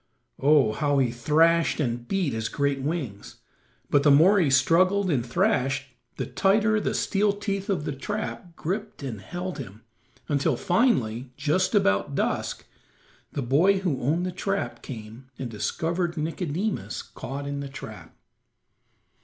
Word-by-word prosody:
Oh, 140 -6 +4
how 145 +3 +1
he 130 -3 +2
thrashed 160 +8 +3
and 120 -4 -2
beat 185 -9 0
his 110 0 -2
great 140 -1 0
wings, 135 - -4 0.5
but 145 - +3
the 145 - +4
more 170 +9 +6
he 160 -6 +3
struggled 185 +8 +3
and 130 -5 +1
thrashed 135 +2 0 0.2
the - - -2
tighter 215 +2 +2
the - - -1
steel 205 +1 +2
teeth 200 0 -3
of 180 -7 0
the - - -2
trap 180 +3 -5
gripped 200 0 -4
and 115 -7 -5
held 180 -1 -5
him, 110 -4 -9 0.4
until 145 -2 +1
finally, 130 - +1
just 170 +8 +1
about 100 - +2
dusk, - - -1 0.7
the 140 - -2
boy 165 +11 +4
who 170 -9 -1
owned 160 +8 +1
the 185 - -2
trap 195 +2 -3
came 115 +1 -9
and 125 -3 -5
discovered 170 - -2
Nicodemus 165 +5 -2
caught 140 +3 -7
in 140 0 -3
the 140 -1 -5
trap. 135 - -10
150 Hz, 145 wpm, -26 LUFS, 130-185 Hz, 0.7 s, more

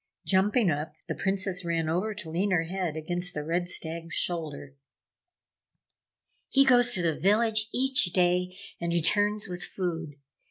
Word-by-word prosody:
Jumping 200 +1 +2
up, 150 +1 -4
the - - -2
Princess 190 -1 -1
ran 165 -2 -1
over 185 +7 -1
to 185 -6 -6
lean 185 +5 0
her 175 -4 +2
head 175 -2 -3
against 175 +3 -3
the 150 - -3
Red 175 +3 -2
Stag's 165 0 -2
shoulder. 155 -5 -2 1.8
"He 275 0 +4
goes 245 -2 +5
to 180 - +1
the 165 -2 +2
village 215 +2 +2
each 265 -2 +3
day 180 +1 +1 0.2
and 170 0 -2
returns 205 +5 +1
with 180 -1 -4
food. 165 -5 -4
180 Hz, 150 wpm, -27 LUFS, 165-205 Hz, 1.8 s, goes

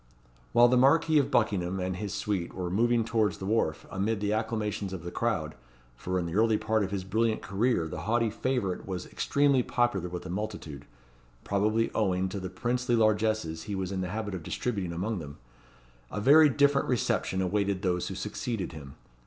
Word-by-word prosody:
While 120 - +6
the 125 +1 +3
Marquis 155 +4 +5
of 140 - 0
Buckingham 95 -5 +1
and 90 0 -2
his 100 +1 -4
suite 100 -3 -2
were 90 -2 -3
moving 115 +3 +2
towards 110 -2 +1
the 95 - -6
wharf, 95 -7 0
amid 100 +3 -1
the 105 0 0
acclamations 105 -3 -2
of 90 -3 -6
the 85 - -5
crowd 80 -10 -1 0.4
(for 90 +9 -3
in 90 - -1
the 85 - -5
early 110 +2 +3
part 110 0 0
of 95 - -2
his 100 -1 -3
brilliant 110 +3 0
career 100 -3 0
the - - -6
haughty 115 0 +1
favourite 110 -6 -2
was 90 -2 -4
extremely 140 -2 +2
popular 110 -8 0
with 90 0 -6
the 90 - -6
multitude, 95 -8 -5 0.6
probably 110 +3 +1
owing 95 -3 +1
to 100 - -4
the 95 -1 -5
princely 120 +5 0
largesses 110 -7 +1
he 100 - -3
was 95 -1 -3
in 95 -1 -2
the 90 - -3
habit 105 0 -4
of 95 - -4
distributing 100 +1 -3
among 95 +5 -2
them), 70 -3 -9 0.7
a - - -4
very 150 +7 +7
different 140 +1 +3
reception 115 -5 0
awaited 100 +1 0
those 90 -2 0
who - - -5
succeeded 115 -7 -4
him. 70 -4 -10
105 Hz, 190 wpm, -29 LUFS, 90-115 Hz, 0.7 s, very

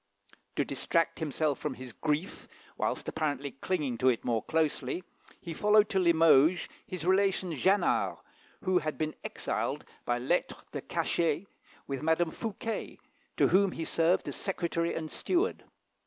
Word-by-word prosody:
To - - +1
distract 165 0 0
himself 155 -2 0
from 150 -3 -3
his 130 -1 -9
grief, 155 - -2 0.3
whilst - - -2
apparently 145 -3 -2
clinging 135 -4 -2
to 130 - +5
it 120 - 0
more 115 -2 +1
closely, 160 - -1 0.4
he 170 - -6
followed 210 +4 +4
to 195 - +1
Limoges 165 -1 +5 0.2
his 180 -3 -5
relation 190 -1 +2
Jannart, 190 +8 +2 0.5
who 185 -1 +3
had 155 -2 -3
been 155 0 -1
exiled - - -2 0.2
by 120 - 0
lettre 135 +9 0 0.2
de - - -4
cachet 165 +1 0 0.4
with 135 0 -4
Madame 160 +1 +2
Fouquet, 225 +2 -4 0.4
to - - +4
whom 195 0 +4
he 165 - -4
served 165 +3 +2
as - - -3
secretary 170 -3 -1
and 160 -1 -4
steward. 375 +5 0
165 Hz, 145 wpm, -30 LUFS, 150-185 Hz, 0.5 s, to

